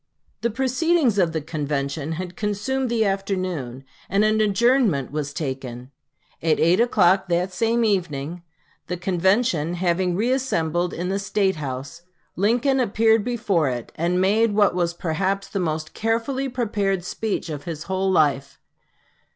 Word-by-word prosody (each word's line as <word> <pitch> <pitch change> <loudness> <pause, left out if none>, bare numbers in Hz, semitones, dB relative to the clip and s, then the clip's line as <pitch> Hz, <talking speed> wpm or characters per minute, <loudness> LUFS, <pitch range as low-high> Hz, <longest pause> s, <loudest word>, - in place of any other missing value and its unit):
The 235 - +1
proceedings 265 - +1
of 175 -3 +3
the 160 -1 -2
convention 145 0 -3
had 180 +1 -6
consumed 215 +6 -1
the 230 -2 +1
afternoon, 185 -10 -2 0.3
and 200 +3 +3
an 215 0 +2
adjournment 215 - +2
was 145 -1 -3
taken. 130 -4 -5 0.5
At 160 -1 +2
8 175 +5 +4
o'clock 195 -5 +3
that 180 +2 0
same 230 +4 +1
evening, 170 -5 -1 0.5
the 180 - -3
convention 180 -2 +1
having 175 0 0
reassembled 180 - 0
in 180 +2 -3
the 195 +1 0
State 195 -2 0
house, 140 +3 -6 0.3
Lincoln 245 +8 +2
appeared 225 -2 +3
before 200 - 0
it, 120 -2 -5
and 175 +3 0
made 205 +3 +3
what 205 -3 +4
was 170 -1 -1
perhaps 190 +4 -1
the 200 - -3
most 155 -3 -2
carefully 235 +5 -1
prepared 205 -7 -1
speech 215 +1 -3
of 145 -1 -6
his 160 -2 -5
whole 190 +2 -1
life. 145 -6 +1
185 Hz, 145 wpm, -23 LUFS, 160-220 Hz, 0.5 s, 8